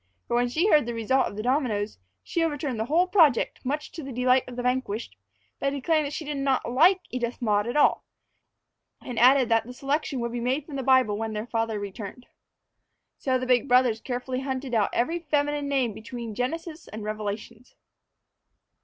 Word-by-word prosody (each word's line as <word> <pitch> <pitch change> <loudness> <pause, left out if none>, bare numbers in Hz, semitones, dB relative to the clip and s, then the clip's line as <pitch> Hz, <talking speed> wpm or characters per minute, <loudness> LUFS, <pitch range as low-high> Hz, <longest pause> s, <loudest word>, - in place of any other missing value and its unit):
For - - -3
when 245 +1 +2
she 315 +9 +1
heard 300 - +4
the 240 - -3
result 255 +4 +2
of - - -8
the 215 - -4
dominoes, 235 - 0 0.2
she 335 - -1
overturned 290 -6 -2
the 220 - 0
whole 330 +8 +3
project, 330 - +3
much 295 +4 -3
to 325 - -7
the 270 -2 -7
delight 250 +1 +3
of 250 - -8
the 245 - -4
vanquished, 245 - -2 0.4
by 275 - +1
declaring 295 +3 +1
that 285 - -5
she 315 - -5
did 295 -1 -3
not 275 -1 0
like 340 +10 +4
Edith 240 -1 -3
Maud 210 -2 +1
at 240 - -1
all; 295 - +4 1.0
and 245 -3 -5
added 255 +1 +6
that 225 0 +2
the 250 - -8
selection 275 +1 -2
would 235 0 -2
be 240 - -3
made 260 +5 -1
from 300 - -8
the 270 - -2
Bible 255 -5 +3
when 225 -1 -3
their 210 +1 -3
father 225 -2 -1
returned. 205 +4 -7 0.9
So 260 -1 +1
the 255 - -3
big 250 +1 +2
brothers 245 -3 +3
carefully 255 0 -3
hunted 265 -1 -4
out 215 -3 +2
every 325 +9 0
feminine 290 -2 0
name 265 -5 +1
between 230 +1 -7
Genesis 320 - -4
and 215 0 -7
Revelations. 215 +3 -6
255 Hz, 195 wpm, -26 LUFS, 230-280 Hz, 1.0 s, added